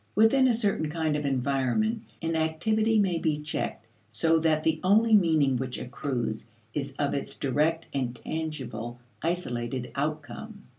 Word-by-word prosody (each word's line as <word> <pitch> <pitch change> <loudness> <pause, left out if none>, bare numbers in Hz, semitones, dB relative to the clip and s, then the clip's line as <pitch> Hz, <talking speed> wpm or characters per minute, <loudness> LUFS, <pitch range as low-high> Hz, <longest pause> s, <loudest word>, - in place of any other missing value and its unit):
Within 240 +5 +5
a 245 - +4
certain 200 -8 0
kind 160 -1 0
of 150 -1 -1
environment, 140 - +1 0.2
an 165 0 0
activity 215 +8 +2
may 185 -5 +2
be 155 -2 0
checked 150 - -4 0.2
so 165 0 +3
that 155 -1 +2
the 160 -1 +2
only 220 +4 +4
meaning 160 -9 +4
which 130 0 -3
accrues 125 -4 -3 0.3
is 140 -2 -3
of 145 -1 0
its 140 - -4
direct 155 +5 +1
and 125 -3 -1
tangible 125 -6 -5 0.2
isolated 125 -8 -2
outcome. 155 +9 -4
155 Hz, 145 wpm, -28 LUFS, 135-180 Hz, 0.3 s, Within